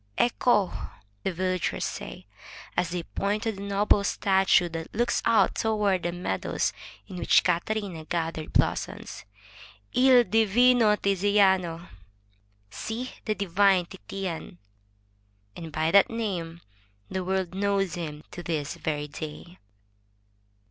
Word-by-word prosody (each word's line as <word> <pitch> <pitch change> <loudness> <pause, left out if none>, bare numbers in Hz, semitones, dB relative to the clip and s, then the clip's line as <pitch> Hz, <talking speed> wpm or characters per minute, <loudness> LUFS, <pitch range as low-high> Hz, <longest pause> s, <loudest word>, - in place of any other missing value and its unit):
Ecco!" 240 -4 +2 0.5
the - - -1
villagers 185 +1 -1
say, - - -7 0.5
as 180 -1 0
they 175 0 -3
point 205 +5 -2
to 225 - 0
a - - 0
noble 200 +1 +1
statue 190 -3 +3
that 165 -1 -6
looks 235 +2 +1
out 230 -1 +4
toward 210 -4 +1
the 175 - -2
meadows 170 - -2 0.3
in 180 - -9
which - - +4
Catarina 180 -1 -1
gathered 165 -2 -3
blossoms, - - -1 0.7
'*I1 250 -2 +5
divino 225 +1 +4
Tiziano. 190 -4 +2 0.4
— 100 0 -39
See, 235 - -5
the 215 - 0
divine 195 -1 +3
Titian!" 170 - -6 1.0
And 165 -2 -8
by 155 +1 0
that 200 0 +6
name 180 -8 -4 0.5
the 190 -1 -3
world 190 -1 -1
knows 195 -2 0
him 155 -3 -6
to 175 - -7
this 155 -4 -3
very 150 -1 -3
day. 155 +4 -9
185 Hz, 120 wpm, -27 LUFS, 165-205 Hz, 1.0 s, that